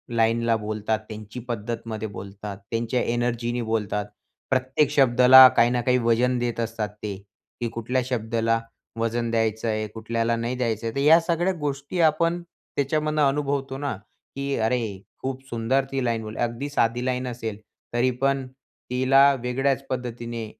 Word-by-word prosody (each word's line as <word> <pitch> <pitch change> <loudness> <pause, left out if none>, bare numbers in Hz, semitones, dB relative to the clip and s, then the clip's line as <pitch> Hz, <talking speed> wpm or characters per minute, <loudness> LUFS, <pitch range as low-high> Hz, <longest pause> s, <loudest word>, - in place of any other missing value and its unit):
लाईनला 115 0 +2
बोलतात, 110 0 -2
त्यांची 110 +2 -8
पद्धतमध्ये 115 -1 -4
बोलतात, 100 0 -8
त्यांच्या 115 +2 0
एनर्जीनी 120 0 -1
बोलतात. 105 -2 -1 0.4
प्रत्येक 130 +2 +2
शब्दाला 130 -1 +8
काही 115 - +6
ना 120 0 0
काही 125 +1 +2
वजन 120 +1 +2
देत 120 -1 -2
असतात 115 -2 -2
ते, 105 -2 -3 0.5
की 120 - 0
कुठल्या 115 +3 -1
शब्दाला 115 -2 0 0.4
वजन 115 +1 -1
द्यायचं 110 0 0
आहे 110 -1 -1
कुठल्याला 115 +1 -1
नाही 115 +2 -2
द्यायचं 115 -3 -2
आहे 115 - -4
तर - - 0
या 155 +4 +7
सगळ्या 170 +2 0
गोष्टी 145 +3 -3
आपण 165 +2 +2
त्याच्यामधनं 155 -2 -2
अनुभवतो 140 -1 -1
ना, 140 -4 -2 0.4
की 140 0 -2
अरे, 110 -3 -1 0.2
खूप 130 0 -4
सुंदर 120 +4 +1
ती 135 -1 -1
लाईन 110 -2 -2
अगदी 120 +4 -2
साधी 120 -3 0
लाईन 130 0 -1
असेल, 115 -4 -5 0.4
तरी 120 +2 +2
पण 135 -1 +1 0.4
तिला 130 +2 +4 0.2
वेगळ्याच 135 +2 0
पद्धतीने 120 -2 -4
120 Hz, 145 wpm, -24 LUFS, 115-135 Hz, 0.5 s, शब्दाला